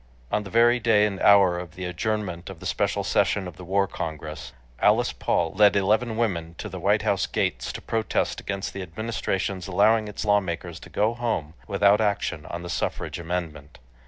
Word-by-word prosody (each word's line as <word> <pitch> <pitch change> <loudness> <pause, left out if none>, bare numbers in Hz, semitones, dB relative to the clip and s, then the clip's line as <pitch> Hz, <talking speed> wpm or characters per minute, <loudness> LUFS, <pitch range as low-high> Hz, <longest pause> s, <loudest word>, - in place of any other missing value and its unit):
On 105 - +1
the 95 - -9
very 120 +3 +4
day 110 -2 +4
and 100 -2 -3
hour 95 -3 +5
of 90 0 -9
the 90 0 -5
adjournment 90 -1 -3
of 95 -4 -9
the - - -10
special - - 0
session 95 -2 +1
of 90 - -9
the 90 - -10
War 100 +2 +1
Congress, 75 -6 -6 0.3
Alice - - +3
Paul 80 -1 0
led 105 -1 +5
eleven 110 +4 +1
women 85 -8 -1
to - - -6
the - - -7
White - - +2
House - - +1
gates - - -1
to - - -8
protest 110 -1 -1
against 100 -1 -4
the 100 - -5
Administration's 95 0 -3
allowing 105 +3 +3
its 105 +2 -5
lawmakers 90 -5 0
to - - -13
go 110 +3 +1
home 115 -11 -2
without 100 +1 +4
action 100 -6 -1
on 85 +1 -6
the - - -6
suffrage 85 - -3
amendment. 80 -4 -5
95 Hz, 190 wpm, -25 LUFS, 85-105 Hz, 0.3 s, hour